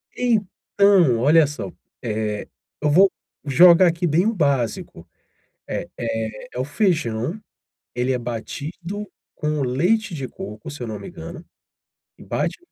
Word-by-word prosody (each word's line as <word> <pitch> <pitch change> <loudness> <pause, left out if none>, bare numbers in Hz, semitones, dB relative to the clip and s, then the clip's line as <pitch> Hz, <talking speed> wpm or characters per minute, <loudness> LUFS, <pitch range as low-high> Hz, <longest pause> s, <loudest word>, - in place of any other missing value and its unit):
Então, 200 - +3
olha 150 +5 +5
só, 145 - -6 0.3
eh, 105 -2 -2 0.3
eu 150 - +2
vou 190 +5 +6 0.3
jogar 170 +5 +7
aqui 170 +1 0
bem 165 +5 +2
o 225 - +2
básico. 130 - -1 0.6
Eh - - -3
eh, 110 -2 -4
é - - -7
o 130 - 0
feijão, 155 - 0 0.5
ele 125 +2 0
é 125 - 0
batido 155 - -5 0.3
com 150 -1 -2
o - - +1
leite 175 - +1
de 135 -4 -4
coco, 105 +10 -8
se 145 -3 -8
eu - - -3
não 110 -2 -5
me - - -9
engano, 170 0 -9 0.7
e - - -13
bate, - - -2
150 Hz, 145 wpm, -22 LUFS, 120-180 Hz, 0.7 s, jogar